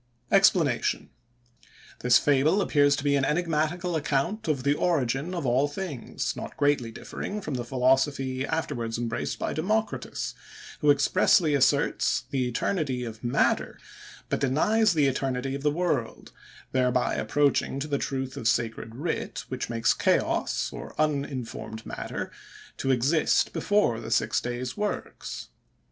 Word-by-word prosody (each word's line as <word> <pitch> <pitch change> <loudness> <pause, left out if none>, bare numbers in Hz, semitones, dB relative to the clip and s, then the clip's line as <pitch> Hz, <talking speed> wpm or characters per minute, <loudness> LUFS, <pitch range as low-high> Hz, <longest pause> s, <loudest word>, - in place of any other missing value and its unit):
EXPLANATION.—This 120 0 +1
fable 145 +6 +3
appears 145 -6 +3
to 145 - -5
be 145 -1 +3
an 140 - +2
enigmatical 165 +3 0
account 155 +7 -1
of 140 -5 0
the 140 +1 +3
origin 150 +1 0
of 170 -5 -3
all 130 +3 +3
things, 145 -4 -4
not - - -7
greatly 145 -4 +2
differing 200 - -6
from 155 -8 -5
the 125 -2 -2
philosophy 130 +1 +1
afterwards 120 -8 -2
embraced 115 -1 -3
by - - -2
Democritus, 215 +7 -2 0.5
who 150 - +2
expressly 155 +3 +4
asserts 140 -1 +2
the 130 -2 0
eternity 130 0 -1
of 110 -1 -7
matter, 120 +3 +1 0.5
but - - -1
denies 200 +10 +2
the 150 -2 +4
eternity 135 0 -1
of 140 - -4
the 150 - +2
world; 150 -7 -2 0.4
thereby 125 -1 +1
approaching 145 -1 +1
to 145 - -3
the 140 -2 -1
truth 130 -1 -3
of 115 - -2
sacred 115 -1 -1
writ, 145 -5 -3
which 130 -2 -4
makes 115 -1 +2
chaos, - - 0
or - - -9
uninformed 140 -7 -2
matter, - - -5 0.4
to 135 - -3
exist 135 +5 +2
before 205 - +1
the 115 -1 -7
six 115 - +1
days' 125 +1 -4
works. 210 0 -4
140 Hz, 135 wpm, -27 LUFS, 125-155 Hz, 0.5 s, expressly